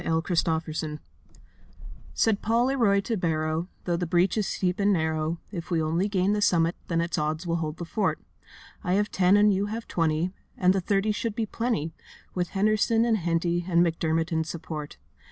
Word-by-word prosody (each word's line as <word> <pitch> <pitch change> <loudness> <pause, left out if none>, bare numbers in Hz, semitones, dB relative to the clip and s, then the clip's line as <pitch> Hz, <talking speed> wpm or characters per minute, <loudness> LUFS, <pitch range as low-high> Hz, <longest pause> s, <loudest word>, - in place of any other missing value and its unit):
THE 165 +2 -1
STORMING 160 -1 +2
PARTY 155 -1 -4 1.2
Said 220 -3 +2
Paul 230 +2 +2
Leroy 230 -7 +3
to 225 +3 -2
Barrow, 160 -1 -1 0.2
'Though 175 -1 0
the 175 0 -2
breach 175 +3 +2
is 215 -3 0
steep 180 0 -1
and 200 0 +3
narrow, 160 -2 0
If 175 -4 -6
we 170 -3 +1
only 165 +5 0
gain 195 0 +1
the 210 - 0
summit 170 -4 +3
Then 165 -1 +1
it's 170 -1 -1
odds 155 +3 -2
we 170 -1 0
hold 160 -2 -3
the 175 - -5
fort. 200 +3 -1 0.6
I 180 -3 0
have 205 +2 +1
ten 190 +2 +4
and 210 0 +5
you 195 +2 0
have 225 +2 -5
twenty, 165 +1 0 0.3
And 185 0 +4
the 190 - 0
thirty 200 +3 +1
should 225 0 -3
be 225 - 0
plenty, 215 -8 -2 0.4
With 180 -1 -1
Henderson 215 +3 +3
and 230 -2 +2
Henty 170 -1 0
And 170 0 +4
McDermott 165 0 0
in 160 -1 +1
support. 155 -2 -6
175 Hz, 190 wpm, -26 LUFS, 165-205 Hz, 1.2 s, and